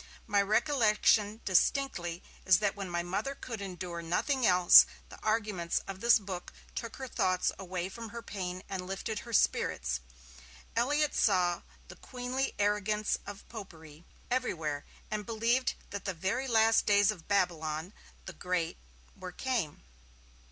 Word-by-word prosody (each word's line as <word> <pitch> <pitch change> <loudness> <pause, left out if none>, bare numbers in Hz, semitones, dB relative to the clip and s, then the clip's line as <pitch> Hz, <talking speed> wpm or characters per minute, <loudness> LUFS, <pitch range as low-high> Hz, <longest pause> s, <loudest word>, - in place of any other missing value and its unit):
My 205 -2 +3
recollection 215 -2 +2
distinctly 180 -4 +1 0.2
is 185 -2 +6
that 205 -2 0
when 195 -2 -5
my 175 0 -1
Mother 205 +10 -2
could 230 -6 -7
endure 180 -3 -5
nothing 240 - +1
else, 180 -1 +8 0.2
the - - -12
arguments 210 -6 0
of 195 -1 -6
this 235 +2 +6
book 190 -4 -6 0.2
took 230 -1 -5
her 265 - -6
thoughts 185 -6 +1
away 185 -1 -3
from 225 +4 -8
her 235 +2 -8
pain 185 -2 -5
and 185 -2 -5
lifted 195 +3 -3
her 235 - -10
spirits. 65 - +1 0.8
Elliott 290 +5 +2
saw 180 -4 +2 0.3
'the - - -12
queenly 255 +1 -3
arrogance 210 +1 +1
of 200 -1 -9
Popery' 165 -8 -11 0.3
everywhere, 160 - -1 0.3
and 215 -1 -2
believed 230 +4 +1 0.2
that 200 0 -5
the 195 -2 -2
very 215 +11 -1
last 225 -2 +4
days 205 0 +5
of 180 -6 -11
Babylon 170 -3 0 0.3
the 190 - -7
Great 180 -1 -2 0.4
were 185 -1 -8
came. 225 - -2
200 Hz, 145 wpm, -31 LUFS, 180-230 Hz, 0.8 s, else